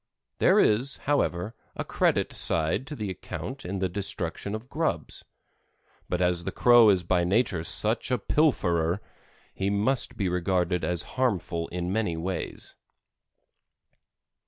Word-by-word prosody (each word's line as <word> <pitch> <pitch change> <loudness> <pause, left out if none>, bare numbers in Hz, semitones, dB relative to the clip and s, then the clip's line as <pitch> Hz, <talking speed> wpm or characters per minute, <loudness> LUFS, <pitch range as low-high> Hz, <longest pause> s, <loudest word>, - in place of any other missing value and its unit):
There - - +5
is, 125 +6 +3
however, 110 -8 0 0.2
a - - -3
credit - - +1
side 80 +11 0
to 150 - -6
the 105 -6 -3
account 130 +8 -6
in 95 +3 -4
the 95 0 0
destruction 95 +1 -3
of 110 +3 -8
grubs; 160 +4 -2 0.9
but 90 - 0
as 90 -1 +1
the - - -3
Crow 120 -2 +6
is 95 -3 +3
by 90 0 +2
nature 95 -2 +1
such 110 +6 0
a 125 - +2
pilferer, 90 - +1 0.5
he 95 +1 -1
must 105 +6 0
be 100 - 0
regarded 90 0 0
as 90 -1 -1 0.2
harmful 90 -8 0
in 90 +1 -3
many 105 -7 0
ways. 90 +3 -4
95 Hz, 135 wpm, -27 LUFS, 90-115 Hz, 0.9 s, Crow